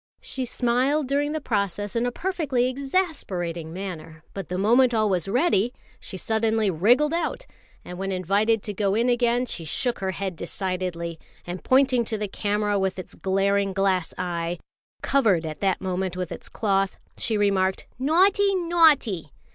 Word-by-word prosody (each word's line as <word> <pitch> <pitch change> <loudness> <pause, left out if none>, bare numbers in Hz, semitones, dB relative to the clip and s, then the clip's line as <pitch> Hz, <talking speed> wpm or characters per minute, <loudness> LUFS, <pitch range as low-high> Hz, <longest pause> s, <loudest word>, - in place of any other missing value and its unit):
She 260 -1 -3
smiled 255 +5 +1
during 285 +2 0
the 315 - -2
process 205 - -2
in 235 +1 +1
a - - -1
perfectly 290 -7 0
exasperating 255 - -2
manner, 165 -4 -7
but 195 -3 -6
the 180 - -2
moment 240 +5 +4
all 215 -1 +3
was 180 -2 0
ready 245 - +2 0.3
she 190 - -7
suddenly 220 0 +1
wriggled 245 - +3
out; 340 - -2 0.4
and 180 0 -8
when 195 0 -2
invited 200 +4 +1
to 210 - -3
go 200 0 0
in 235 +3 +2
again, 240 0 +2
she 180 -8 -5
shook 240 - -1
her 190 - -2
head 190 -1 -3
decidedly, 170 -1 -3 0.3
and 175 +1 -6
pointing 260 -2 +4
to 220 -1 -2
the 210 0 -2
camera 205 +1 0
with 190 -1 -1
its 185 - -7
glaring 195 +1 +1
glass 190 -3 +1
eye, 175 -1 -2 0.5
covered 205 -12 +2
at 155 -1 -5
that 195 -2 +1
moment 185 -1 -2
with 180 -2 -3
its - - -8
cloth, 195 -3 0 0.2
she 220 - -1
remarked, 190 -2 +1
"Naughty! 385 +8 +3
Naughty!" 310 - +3
205 Hz, 165 wpm, -25 LUFS, 185-250 Hz, 0.5 s, moment